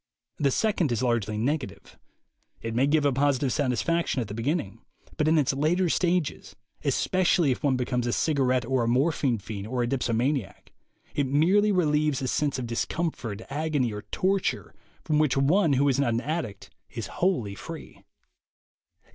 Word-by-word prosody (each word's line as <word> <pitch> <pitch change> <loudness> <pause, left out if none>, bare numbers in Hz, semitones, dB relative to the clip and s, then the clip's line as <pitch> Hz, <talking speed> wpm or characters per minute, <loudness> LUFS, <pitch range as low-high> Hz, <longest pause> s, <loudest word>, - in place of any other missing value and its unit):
The 140 - +3
second 180 - +1
is 120 +1 0
largely 115 -4 0
negative; 135 +4 -3 0.6
it 115 0 -5
may 130 +4 +2
give 150 0 +2
a 140 - +3
positive 135 -1 +1
satisfaction 145 +4 0
at 115 -4 -3
the - - -5
beginning, 115 - -2 0.3
but 150 - 0
in 160 +1 +4
its 145 -3 +2
later 165 +6 +1
stages, 175 -2 -1 0.3
especially 180 -5 +2
if 125 - -2
one 140 -3 +2
becomes 125 -1 -1
a - - 0
cigarette 130 -4 +1
or 130 0 +1
a - - -1
morphine 130 0 +1
fiend 100 0 -7
or 125 +1 -1
a - - -1
dipsomaniac, 125 -1 -1 0.4
it 140 -2 0
merely 185 +10 +3
relieves 150 -6 +2
a - - -1
sense 145 +2 0
of 125 - -3
discomfort, 115 -3 -3
agony, 145 -5 0
or 105 - -5
torture, 195 +1 -1 0.3
from 150 -1 +1
which 150 -3 +2
one 155 +4 +3
who 140 +2 +3
is 135 -1 +2
not 120 -5 +1
an 115 - 0
addict 130 - -4 0.2
is - - -5
wholly 155 - -1
free. - - -10
140 Hz, 165 wpm, -26 LUFS, 120-155 Hz, 0.6 s, in